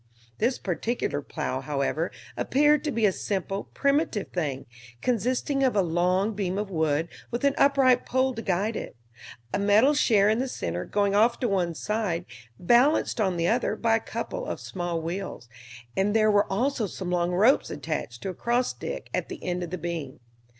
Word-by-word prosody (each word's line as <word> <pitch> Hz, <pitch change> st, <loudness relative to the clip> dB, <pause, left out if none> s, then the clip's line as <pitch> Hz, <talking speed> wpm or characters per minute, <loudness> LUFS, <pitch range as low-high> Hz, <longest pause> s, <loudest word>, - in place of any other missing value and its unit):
This 245 Hz, +3 st, +1 dB
particular 225 Hz, +6 st, -2 dB
plow, -, -, -3 dB
however, -, -, -1 dB, 0.2 s
appeared 295 Hz, +2 st, +3 dB
to 300 Hz, -, 0 dB
be 230 Hz, -3 st, +1 dB
a 200 Hz, -, +4 dB
simple, 195 Hz, +1 st, -3 dB
primitive 280 Hz, -7 st, +1 dB
thing, 145 Hz, -7 st, -3 dB, 0.3 s
consisting 255 Hz, -, 0 dB
of 260 Hz, -4 st, +2 dB
a 200 Hz, -, +4 dB
long 180 Hz, +5 st, +1 dB
beam 195 Hz, -2 st, -2 dB
of 205 Hz, -1 st, -3 dB
wood, 160 Hz, -1 st, +1 dB, 0.2 s
with 240 Hz, +2 st, -3 dB
an 280 Hz, -1 st, +4 dB
upright 270 Hz, -3 st, +4 dB
pole 260 Hz, +1 st, +1 dB
to 225 Hz, -, -5 dB
guide 200 Hz, +3 st, 0 dB
it; -, -, -6 dB, 0.6 s
a -, -, +1 dB
metal 210 Hz, +8 st, +5 dB
share 215 Hz, -8 st, +4 dB
in 220 Hz, +2 st, +2 dB
the 265 Hz, -, 0 dB
center, 90 Hz, -, -4 dB
going 200 Hz, -1 st, +1 dB
off 225 Hz, +4 st, +3 dB
to 245 Hz, -, +2 dB
one 180 Hz, -5 st, 0 dB
side, 200 Hz, -3 st, -2 dB, 0.3 s
balanced 240 Hz, -, +3 dB
on 190 Hz, -4 st, +1 dB
the 170 Hz, 0 st, +1 dB
other 230 Hz, 0 st, +1 dB
by 225 Hz, 0 st, +2 dB
a -, -, -3 dB
couple -, -, -5 dB
of -, -, -4 dB
small 175 Hz, -2 st, -3 dB
wheels; 170 Hz, -6 st, -5 dB, 0.5 s
and 200 Hz, +2 st, +1 dB
there 215 Hz, -1 st, +4 dB
were 205 Hz, -1 st, +2 dB
also 235 Hz, +2 st, 0 dB
some 185 Hz, -1 st, -5 dB
long 175 Hz, -1 st, +1 dB
ropes 215 Hz, +9 st, +4 dB
attached 125 Hz, -7 st, -4 dB
to -, -, -2 dB
a -, -, -4 dB
cross 240 Hz, +5 st, 0 dB
stick -, -, -6 dB
at -, -, -2 dB
the 365 Hz, -4 st, -8 dB
end 180 Hz, 0 st, -2 dB
of 175 Hz, -, -4 dB
the 185 Hz, -, -4 dB
beam. 165 Hz, -5 st, -5 dB
205 Hz, 185 wpm, -26 LUFS, 175-245 Hz, 0.6 s, metal